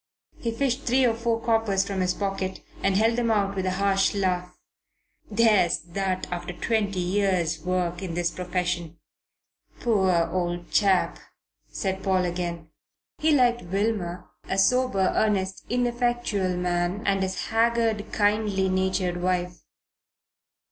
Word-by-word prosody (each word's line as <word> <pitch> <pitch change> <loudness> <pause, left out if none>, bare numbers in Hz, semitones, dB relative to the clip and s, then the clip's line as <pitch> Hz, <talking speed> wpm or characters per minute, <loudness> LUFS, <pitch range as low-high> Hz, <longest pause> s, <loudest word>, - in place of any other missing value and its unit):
He 230 - -2
fished 255 +2 -1
three 255 +1 +2
or 235 - +3
four 230 0 -1
coppers 225 -4 +1
from 195 -2 -2
his 180 0 +1
pocket 195 -2 -3 0.2
and 195 -1 +2
held 225 +2 +3
them 235 -1 +1
out 200 -2 +1
with 190 -1 -1
a 185 0 -1
harsh 195 0 +2
laugh. 180 -2 -1 0.7
"There's 210 -5 +4
that 185 +2 -3
after 180 0 -4
twenty 205 0 -1
years' 180 -3 0
work 180 -1 -1
in 180 -4 -4
this 175 -1 0
profession." 175 -2 -3 0.8
"Poor 200 -6 +2 0.2
old 175 -1 -2
chap!" 195 -3 +2 0.5
said 190 -1 -2
Paul 185 -2 +1
again. 170 -2 -4 0.5
He 315 - +2
liked 245 -4 +3
Wilmer, 185 -1 -2 0.2
a 190 - -1
sober, 200 -2 +3
earnest, 190 -3 0
ineffectual 240 -6 0
man, 180 +3 -1
and 195 -1 +2
his 190 -1 -3
haggard, 225 -1 +1
kindly 205 -2 +1
natured 185 -1 0
wife. 180 -1 -1
195 Hz, 135 wpm, -25 LUFS, 180-220 Hz, 0.8 s, There's